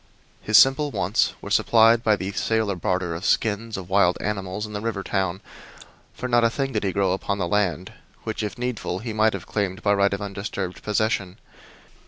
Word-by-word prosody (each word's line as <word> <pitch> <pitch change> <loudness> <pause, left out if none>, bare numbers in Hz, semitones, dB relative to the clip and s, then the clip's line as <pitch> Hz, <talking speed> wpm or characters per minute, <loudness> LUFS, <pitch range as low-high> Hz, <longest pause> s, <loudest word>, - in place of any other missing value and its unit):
His 105 0 +4
simple 140 +3 +5
wants 100 -5 0
were - - -7
supplied 115 0 +5
by 110 -2 +4
the 95 0 -4
sale 110 +1 0
or - - -2
barter 90 0 -1
of 85 +3 -6
skins 110 +1 0
of 95 -2 -7
wild 95 -2 +3
animals 100 0 -3
in 105 - -9
the 105 - -4
river 110 -3 -3
town, 95 -2 -2 0.7
for 125 - -5
not 120 -1 +3
a 115 - +4
thing 135 +2 -3
did - - -1
he 95 - 0
grow 95 -1 +1
upon 95 +1 -2
the 90 -3 -1
land 95 -3 -1 0.3
which, 110 0 -4
if 105 +2 -4
needful, 120 -7 -3
he 110 +3 -5
might 110 0 +3
have 100 - -6
claimed 100 -1 -3
by 100 - +3
right 100 0 +2
of 100 - -2
undisturbed 100 -2 -5
possession. 105 -3 -1
100 Hz, 205 wpm, -24 LUFS, 95-110 Hz, 0.7 s, simple